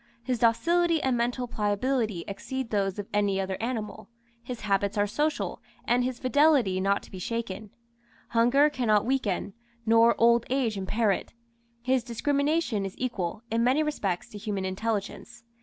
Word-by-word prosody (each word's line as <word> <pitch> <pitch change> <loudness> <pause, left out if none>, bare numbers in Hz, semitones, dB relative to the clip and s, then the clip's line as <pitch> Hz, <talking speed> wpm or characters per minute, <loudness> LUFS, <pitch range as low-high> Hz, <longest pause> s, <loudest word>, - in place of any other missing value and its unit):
His 250 -1 -1
docility 335 +9 +3
and 260 -2 +2
mental 245 +1 -1
pliability 215 -2 -1
exceed 255 +5 -5
those 195 -2 0
of 205 -1 -5
any 205 -2 +1
other 190 0 -2
animal; 225 -3 -4 0.3
his 240 0 -7
habits 200 0 0
are 205 - +3
social, 300 +9 -2 0.2
and 245 +1 +2
his 250 -1 -2
fidelity 255 -8 +3
not 200 +1 +1
to - - -15
be 185 - -7
shaken; 215 0 -4 0.6
hunger 245 +5 +4
cannot 220 -7 +2
weaken, 210 -6 -1 0.3
nor 230 +1 +5
old 235 0 +4
age 250 -4 0
impair 205 +3 +1
it. 195 - -4 0.5
His 255 -1 +1
discrimination 280 0 0
is 195 0 -5
equal, 220 -4 -3
in 230 +1 +2
many 260 +6 +3
respects, 200 - -2
to 210 - -9
human 200 -3 -3
intelligence. 205 +3 -4
230 Hz, 155 wpm, -27 LUFS, 205-255 Hz, 0.6 s, nor